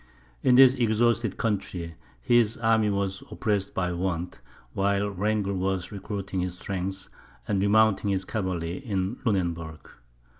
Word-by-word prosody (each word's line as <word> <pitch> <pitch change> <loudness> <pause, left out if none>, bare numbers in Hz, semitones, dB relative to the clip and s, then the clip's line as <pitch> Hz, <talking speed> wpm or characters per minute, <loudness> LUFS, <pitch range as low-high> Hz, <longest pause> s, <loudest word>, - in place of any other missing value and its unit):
In 125 - +4
this 130 0 +8
exhausted 115 -2 +1
country, 95 -6 -2 0.3
his 120 -2 +3
army 110 -2 +2
was 100 -1 -2
oppressed 105 -3 -1
by 90 -1 0
want, 90 -1 -3 0.3
while 100 +1 +1
Wrangel 100 +1 -1
was 95 -1 -2
recruiting 100 -1 -4
his 90 0 -3
strength, 95 0 -4 0.4
and 100 -2 +1
remounting 105 0 +3
his 95 -1 -1
cavalry 90 -4 -3
in 100 0 -3
Lunenburg. 85 -7 -1
100 Hz, 125 wpm, -26 LUFS, 95-110 Hz, 0.4 s, this